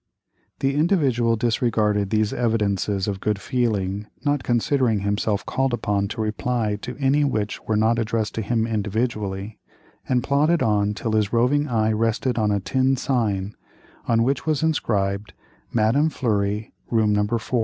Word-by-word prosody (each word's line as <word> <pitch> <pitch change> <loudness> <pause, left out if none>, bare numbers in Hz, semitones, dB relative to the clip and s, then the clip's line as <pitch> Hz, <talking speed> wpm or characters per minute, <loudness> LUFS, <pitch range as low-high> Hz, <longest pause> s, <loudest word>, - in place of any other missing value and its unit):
The 135 0 +1
Individual 140 -8 +2
disregarded 110 -3 +1
these 110 0 +1
evidences 105 -4 0
of 100 -2 -2
good 105 -2 0
feeling, 105 -4 -1 0.2
not 145 -1 +1
considering 120 -2 +1
himself 100 +1 -1
called 135 -2 0
upon 100 -3 -1
to 110 +2 -4
reply 110 -1 -1
to 125 0 -6
any 140 +1 +2
which 110 -7 -1
were 110 - +1
not 110 +2 +2
addressed 115 -1 -1
to 115 - -2
him 110 +1 0
individually, 105 -2 -2 0.5
and 125 -2 +2
plodded 150 +4 +2
on 105 -1 +1
till 110 - -3
his 110 -1 +1
roving 130 +5 +2
eye 110 -4 +1
rested 115 +2 0
on 105 -1 +2
a 100 -1 +1
tin 130 +6 +1
sign, 105 -7 -1 0.5
on 115 0 +3
which 135 +5 -1
was 155 -1 +1
inscribed, 105 -10 0 0.4
"Madame 120 +8 +2
Fleury, 105 -5 -1 0.2
Room 110 -3 +2
No. 105 0 +2
4." 115 +2 -1
110 Hz, 155 wpm, -23 LUFS, 105-125 Hz, 0.5 s, on